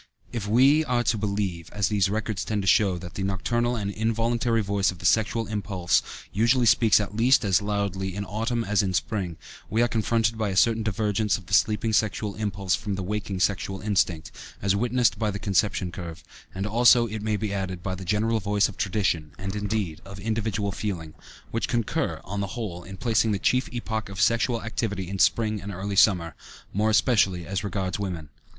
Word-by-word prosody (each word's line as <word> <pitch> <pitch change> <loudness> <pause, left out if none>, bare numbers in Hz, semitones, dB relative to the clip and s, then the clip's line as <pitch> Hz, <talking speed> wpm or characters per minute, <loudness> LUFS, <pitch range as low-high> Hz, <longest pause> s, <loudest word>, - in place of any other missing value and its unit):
If 110 -4 -3
we 135 +8 +5
are 125 -3 +1
to 115 - +1
believe, 100 -5 -2
as 100 -2 0
these 100 -3 +2
records 105 -3 -2
tend 105 0 -2
to - - -4
show, 95 -1 +4
that 90 0 -9
the 100 - -5
nocturnal 120 +6 0
and 100 -3 -2
involuntary 115 +1 0
voice 100 -1 +1
of 95 - -5
the 90 - -10
sexual 110 +3 +2
impulse 100 -5 0 0.3
usually 120 +5 +3
speaks 110 -1 +5
at 100 -1 -4
least 120 +2 +4
as 95 -2 +3
loudly 100 -2 -2
in 100 0 -3
autumn 115 +4 -2
as 105 -3 +2
in 95 -2 -1
spring, 85 +3 -2 0.3
we 115 +2 +2
are - - +3
confronted 115 0 0
by 110 -2 0
a 95 - -3
certain 115 +2 +4
divergence 105 -1 0
of 100 - -13
the - - -9
sleeping 110 +1 +2
sexual 105 0 0
impulse 100 -3 -2
from 100 -2 -1
the 95 - -4
waking 100 -1 -3
sexual 95 +1 0
instinct, 95 -6 0 0.3
as 100 0 +1
witnessed 120 +3 +1
by 110 -2 +1
the 100 - -3
conception 100 -2 0
curve, 85 -2 -8 0.3
and 95 +1 -3
also, 120 +2 +5
it 110 -1 -5
may 105 0 0
be 105 -1 -3
added, 95 -3 -3
by 95 - -2
the 95 0 -6
general 110 +4 +1
voice 100 0 +2
of 100 - -10
tradition, 90 -6 -1
and, 95 +1 -5
indeed, 105 -6 -2
of 100 0 -10
individual 105 -1 -1
feeling, 90 -6 -4 0.4
which 115 - -1
concur, 120 -3 -1
on 100 +2 -5
the 100 - -2
whole, 95 -7 -4
in 95 +1 -9
placing 115 -2 +2
the - - 0
chief 125 +6 +1
epoch 110 -3 -3
of 100 -1 -7
sexual 115 +2 +2
activity 100 -4 -3
in 95 +1 -5
spring 110 +3 +2
and 100 - -6
early 100 +2 -4
summer, 90 -5 +4 0.4
more 105 +2 +2
especially 100 -6 +2
as 95 -1 -3
regards 95 -1 -2
women. 90 -7 -4
105 Hz, 200 wpm, -25 LUFS, 95-110 Hz, 0.4 s, we